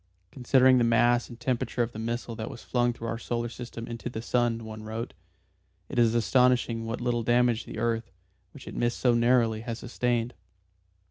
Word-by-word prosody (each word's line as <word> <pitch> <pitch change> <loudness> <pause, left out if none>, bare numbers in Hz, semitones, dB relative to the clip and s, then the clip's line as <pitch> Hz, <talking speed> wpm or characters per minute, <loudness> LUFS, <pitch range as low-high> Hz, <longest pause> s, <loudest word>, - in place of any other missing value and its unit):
"Considering 130 0 +4
the - - +3
mass 120 +1 +3
and 120 -1 -11
temperature 125 0 -1
of 115 - -4
the 110 - -8
missile 115 +1 -3
that 110 +1 -5
was - - -10
flung 120 -1 +1
through 115 -1 -7
our 115 0 -3
solar 120 0 -2
system 115 -1 -7
into 115 +1 -6
the 115 - -5
sun," 115 -1 0
one 110 0 -8
wrote, 110 +2 -5 0.8
"it - - -1
is 115 -1 +4
astonishing 120 -1 +2
what 115 - -3
a - - -6
little 120 -1 0
damage 120 0 +2
the - - -8
earth, 115 0 -1 0.4
which - - -13
it - - -7
missed 120 0 0
so 125 -2 +3
narrowly, 120 -2 +3
has 115 -1 -5
sustained. 120 0 -1
120 Hz, 195 wpm, -28 LUFS, 115-120 Hz, 0.8 s, Considering